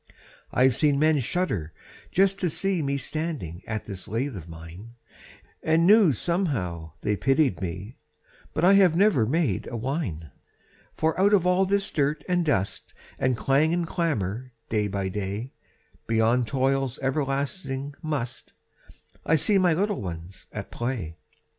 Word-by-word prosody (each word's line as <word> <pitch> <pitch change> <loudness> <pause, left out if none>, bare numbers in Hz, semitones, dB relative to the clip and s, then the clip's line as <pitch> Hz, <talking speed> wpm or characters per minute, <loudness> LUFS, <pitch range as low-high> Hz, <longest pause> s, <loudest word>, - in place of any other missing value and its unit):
I've 130 -1 +4
seen 145 0 +3
men 155 0 +3
shudder 115 - -2 0.4
just 195 +1 +3
to 180 - +1
see 190 +2 0
Me 140 -1 0
standing 145 - -4
at 110 -1 -3
this 95 -3 -8
lathe 125 +4 -2
of 85 -3 -8
mine, 85 +8 -11 0.7
And 160 +1 +3
knew 205 -3 +7
somehow 110 - -2
they 105 - 0
pitied 135 - +2
me, 95 +6 -5 0.6
But 160 - +2
I 190 - +7
have 190 -5 +5
never 180 - +4
made 140 - 0
a 120 - -4
whine; 110 - -3 0.7
For 160 0 +1
out 205 +2 +5
of 180 -3 +1
all 180 +1 +3
this 200 0 0
dirt 150 +1 0
and 180 -1 +2
dust 100 - -1 0.2
And 130 -2 +1
clang 145 +6 +2
and 175 -1 0
clamor 130 - -2 0.2
day 105 -2 +1
by 100 -1 -2
day, 100 +5 -4 0.5
Beyond 115 +2 +2
toil's 135 0 0
everlasting 135 +1 -2
"must," 125 -7 -4 0.7
I 160 - +3
see 195 +6 +3
my 175 -3 +3
little 205 +3 0
ones 90 0 -7
at - - -7
play. 120 -10 -3
135 Hz, 145 wpm, -26 LUFS, 105-165 Hz, 0.7 s, knew